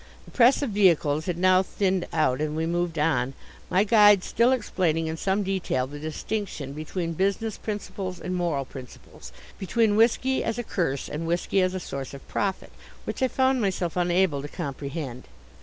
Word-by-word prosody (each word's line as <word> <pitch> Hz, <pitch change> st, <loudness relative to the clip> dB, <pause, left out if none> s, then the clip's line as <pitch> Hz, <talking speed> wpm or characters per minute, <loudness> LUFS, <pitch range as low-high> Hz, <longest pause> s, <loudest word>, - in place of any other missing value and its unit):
The -, -, -15 dB
press 255 Hz, +3 st, +4 dB
of 260 Hz, -, -2 dB
vehicles 165 Hz, -6 st, +3 dB
had 175 Hz, -2 st, -1 dB
now 185 Hz, +1 st, +5 dB
thinned 190 Hz, -1 st, -1 dB
out 150 Hz, -4 st, +1 dB
and 155 Hz, 0 st, -1 dB
we 160 Hz, +1 st, -1 dB
moved 170 Hz, 0 st, -1 dB
on, 135 Hz, -4 st, +1 dB, 0.3 s
my 190 Hz, +2 st, +3 dB
guide 210 Hz, -3 st, +6 dB
still 235 Hz, +3 st, +2 dB
explaining 180 Hz, -9 st, 0 dB
in 160 Hz, 0 st, -3 dB
some 195 Hz, +4 st, 0 dB
detail 185 Hz, -9 st, -1 dB
the 145 Hz, +2 st, -9 dB
distinction 155 Hz, -2 st, -4 dB
between 165 Hz, +3 st, -4 dB
business 200 Hz, +5 st, -1 dB
principles 195 Hz, -3 st, -5 dB
and 180 Hz, +3 st, -4 dB
moral 165 Hz, -6 st, -1 dB
principles, 130 Hz, -2 st, -12 dB, 0.3 s
between 210 Hz, +2 st, +2 dB
whisky 245 Hz, +4 st, +3 dB
as 225 Hz, -, -2 dB
a 240 Hz, -, -2 dB
curse 165 Hz, -, -2 dB
and 165 Hz, +2 st, -4 dB
whisky 175 Hz, +3 st, +1 dB
as 185 Hz, 0 st, 0 dB
a -, -, -2 dB
source 140 Hz, -5 st, -6 dB
of 135 Hz, -, -13 dB
profit, 195 Hz, -2 st, -2 dB, 0.3 s
which -, -, -5 dB
I 260 Hz, -, +4 dB
found 260 Hz, 0 st, +1 dB
myself 185 Hz, -4 st, -1 dB
unable 175 Hz, -4 st, +2 dB
to 145 Hz, -, -6 dB
comprehend. 140 Hz, -4 st, -5 dB
180 Hz, 175 wpm, -26 LUFS, 155-200 Hz, 0.3 s, guide